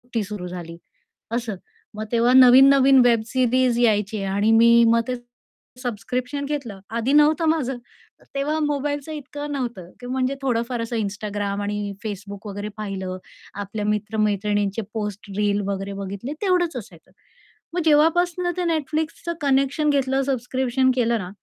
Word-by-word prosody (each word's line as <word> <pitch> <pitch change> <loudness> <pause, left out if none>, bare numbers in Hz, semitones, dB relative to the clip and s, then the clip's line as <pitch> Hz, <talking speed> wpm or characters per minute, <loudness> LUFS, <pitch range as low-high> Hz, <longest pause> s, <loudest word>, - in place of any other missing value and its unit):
ती 225 - +1
सुरु 200 -3 -6
झाली 170 -2 -8 0.5
असं. 230 -3 -2 0.4
मग 215 - -4
तेव्हा 235 +1 +3
नवीन-नवीन 265 +1 +7
वेब 235 -2 +4
सीरीज 255 -1 +2
यायची 210 -3 +1
आणि 200 +3 +1
मी 235 +1 +6
मग 230 0 +4
ते 255 - -1 0.7
सबस्क्रिप्शन 250 +5 -3
घेतलं, 275 -9 -4
आधी 235 +5 -1
नव्हतं 300 +2 +4
माझं. 270 -6 0 0.6
तेव्हा 300 +3 0
मोबाईलचं 290 0 -2
इतकं 290 0 -6
नव्हतं 240 -10 -4
की 245 - -9
म्हणजे 260 +1 -1
थोडं 245 -4 +1
फार 240 -2 -2
असं 230 +1 -4
Instagram 205 -1 -3
आणि 205 0 -3
Facebook 200 0 -6
वगैरे 205 +1 -5
पाहिलं. 190 -3 -4 0.4
आपल्या 205 +1 -5
मित्र-मैत्रिणींचे 210 0 0
पोस्ट, 210 -2 -5
रील 205 -1 +1
वगैरे 195 0 -3
बघितले 200 +7 -5
तेवढंच 360 -5 +1
असायचं. 175 -7 -11 0.6
मग 355 - 0
जेव्हापासून 335 +4 +3
ते 360 - 0
Netflixच 315 +3 -2
कनेक्शन 275 +2 +2
घेतलं 270 -1 +1
सबस्क्रिप्शन 260 0 0
केलं 235 -2 +2
ना, 180 -3 -6
235 Hz, 140 wpm, -23 LUFS, 205-275 Hz, 0.7 s, नवीन-नवीन